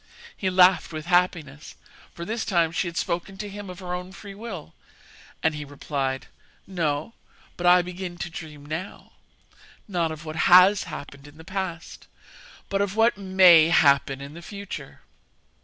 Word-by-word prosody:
He 190 Hz, -, -1 dB
laughed 180 Hz, -2 st, +4 dB
with 155 Hz, -1 st, -6 dB
happiness, 170 Hz, -5 st, 0 dB, 0.4 s
for 170 Hz, -, -8 dB
this 225 Hz, +3 st, -3 dB
time 170 Hz, -5 st, +1 dB
she 175 Hz, +2 st, -1 dB
had 170 Hz, -, -6 dB
spoken 175 Hz, +3 st, -3 dB
to 205 Hz, +1 st, -5 dB
him 205 Hz, -1 st, -8 dB
of 180 Hz, -, -8 dB
her 180 Hz, -1 st, -6 dB
own 180 Hz, +1 st, -6 dB
free 200 Hz, 0 st, -10 dB
will; 195 Hz, -, -8 dB, 0.7 s
and 160 Hz, -, +2 dB
he 150 Hz, 0 st, -5 dB
replied: 140 Hz, -2 st, -3 dB, 0.4 s
'No; 165 Hz, 0 st, -2 dB, 0.4 s
but 175 Hz, -, -1 dB
I 180 Hz, 0 st, +6 dB
begin 180 Hz, 0 st, -7 dB
to 175 Hz, -, -5 dB
dream 150 Hz, -3 st, -9 dB
now 160 Hz, +6 st, -7 dB, 0.8 s
not 175 Hz, -5 st, -1 dB
of 155 Hz, 0 st, -8 dB
what 155 Hz, 0 st, -6 dB
has 185 Hz, +3 st, +7 dB
happened 140 Hz, 0 st, -9 dB
in 145 Hz, +1 st, -16 dB
the 160 Hz, -, -12 dB
past, 185 Hz, -2 st, -6 dB, 0.6 s
but 195 Hz, 0 st, -1 dB
of 200 Hz, 0 st, -1 dB
what 225 Hz, +1 st, +4 dB
may 185 Hz, -5 st, +6 dB
happen 140 Hz, -3 st, +3 dB
in 140 Hz, +1 st, -9 dB
the 170 Hz, -, -10 dB
future.' 190 Hz, -7 st, -8 dB
175 Hz, 165 wpm, -25 LUFS, 155-190 Hz, 0.8 s, has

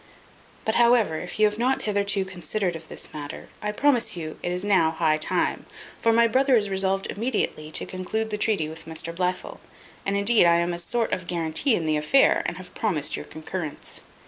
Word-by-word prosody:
But 220 Hz, -, +1 dB
however, 235 Hz, -9 st, +4 dB
if 180 Hz, -, -7 dB
you 215 Hz, -, +6 dB
have 210 Hz, +1 st, 0 dB
not 255 Hz, +3 st, +1 dB
hitherto 200 Hz, -2 st, 0 dB
considered 185 Hz, 0 st, -3 dB
of 165 Hz, -, -9 dB
this -, -, -6 dB
matter, 145 Hz, -1 st, -7 dB
I 210 Hz, -, -1 dB
promise 245 Hz, -4 st, +2 dB
you 155 Hz, -2 st, -6 dB
it 175 Hz, -, -2 dB
is 180 Hz, +2 st, -2 dB
now 190 Hz, -6 st, +4 dB
high 160 Hz, -1 st, +1 dB
time, -, -, 0 dB, 0.3 s
for 230 Hz, -, +3 dB
my 230 Hz, +1 st, +5 dB
brother 260 Hz, +3 st, +3 dB
is 205 Hz, -3 st, +1 dB
resolved 190 Hz, 0 st, +1 dB
immediately 210 Hz, -9 st, -2 dB
to -, -, 0 dB
conclude 215 Hz, +4 st, -3 dB
the 210 Hz, -, -1 dB
treaty 205 Hz, -9 st, +1 dB
with 160 Hz, +1 st, -9 dB
Mr 165 Hz, +1 st, -4 dB
Blifil; 180 Hz, +1 st, -2 dB, 0.4 s
and 195 Hz, +1 st, 0 dB
indeed 200 Hz, -2 st, +4 dB
I 170 Hz, -, +5 dB
am 170 Hz, +1 st, +1 dB
a 170 Hz, -, -4 dB
sort 230 Hz, +6 st, -1 dB
of 180 Hz, -1 st, -3 dB
guarantee 170 Hz, -, +1 dB
in 170 Hz, -, -2 dB
the 155 Hz, -1 st, +1 dB
affair, 155 Hz, -, +4 dB
and 175 Hz, -, -4 dB
have 185 Hz, -1 st, -11 dB
promised 155 Hz, -9 st, -1 dB
your -, -, -6 dB
concurrence." 155 Hz, 0 st, -6 dB
190 Hz, 200 wpm, -25 LUFS, 165-220 Hz, 0.4 s, you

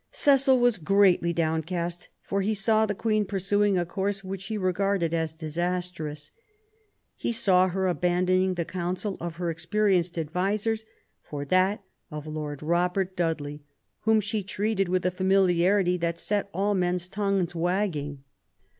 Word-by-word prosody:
Cecil 275 Hz, -, +4 dB
was 240 Hz, -5 st, +3 dB
greatly 185 Hz, 0 st, +3 dB
downcast, 170 Hz, +1 st, -2 dB
for 200 Hz, 0 st, -1 dB
he 215 Hz, +3 st, 0 dB
saw 220 Hz, +2 st, +3 dB
the 205 Hz, -, -2 dB
Queen 215 Hz, 0 st, +1 dB
pursuing 200 Hz, 0 st, +1 dB
a 175 Hz, -, 0 dB
course 195 Hz, +3 st, -2 dB
which 190 Hz, 0 st, -6 dB
he 215 Hz, +2 st, -3 dB
regarded 185 Hz, -2 st, 0 dB
as 160 Hz, -1 st, 0 dB
disastrous; 160 Hz, -1 st, -4 dB, 0.8 s
he -, -, -2 dB
saw 185 Hz, -5 st, +4 dB
her 190 Hz, +1 st, -1 dB
abandoning 185 Hz, +1 st, +1 dB
the 170 Hz, -1 st, -2 dB
counsel 185 Hz, +3 st, -3 dB
of 170 Hz, -1 st, -5 dB
her 170 Hz, -1 st, -2 dB
experienced 175 Hz, 0 st, 0 dB
advisers 200 Hz, +7 st, -1 dB, 0.4 s
for 145 Hz, -1 st, -6 dB
that 185 Hz, +6 st, +2 dB, 0.3 s
of 150 Hz, -2 st, -7 dB
Lord 150 Hz, -2 st, -5 dB
Robert 180 Hz, +3 st, 0 dB
Dudley, 150 Hz, -4 st, -2 dB, 0.4 s
whom 220 Hz, -1 st, +3 dB
she 210 Hz, +1 st, -2 dB
treated 200 Hz, 0 st, -1 dB
with 185 Hz, -1 st, 0 dB
a 180 Hz, -, +2 dB
familiarity 185 Hz, 0 st, +3 dB
that 170 Hz, -1 st, -2 dB
set 205 Hz, +1 st, -1 dB
all 200 Hz, +3 st, 0 dB
men's 180 Hz, -1 st, 0 dB
tongues 195 Hz, -3 st, -1 dB
wagging. 165 Hz, -6 st, -2 dB
185 Hz, 145 wpm, -26 LUFS, 170-200 Hz, 0.8 s, Cecil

